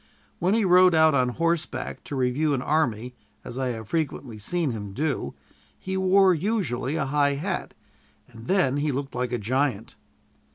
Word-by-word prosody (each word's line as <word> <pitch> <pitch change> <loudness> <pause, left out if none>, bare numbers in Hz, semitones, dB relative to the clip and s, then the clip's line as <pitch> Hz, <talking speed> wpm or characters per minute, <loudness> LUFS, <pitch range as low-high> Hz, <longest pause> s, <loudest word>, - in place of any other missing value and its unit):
When 185 +5 +2
he 225 -3 +2
rode 180 -1 +6
out 160 -1 +5
on 130 -2 +2
horseback 165 +4 -2
to 145 - -5
review 135 +4 +1
an 125 - -3
army, 125 -6 0 0.3
as 125 - -7
I 130 - 0
have 110 -3 -5
frequently 140 -8 -3
seen 160 +6 -1
him 105 -3 -6
do, 145 +5 -2 0.4
he 190 0 -5
wore 190 0 +4
usually 160 - -1
a 155 - 0
high 145 0 +1
hat, 140 - -4 0.5
and 115 -1 -13
then 180 -8 +2
he 145 +1 0
looked 135 +1 -4
like 125 0 -2
a 120 - 0
giant. 120 0 -1
140 Hz, 170 wpm, -25 LUFS, 125-170 Hz, 0.5 s, rode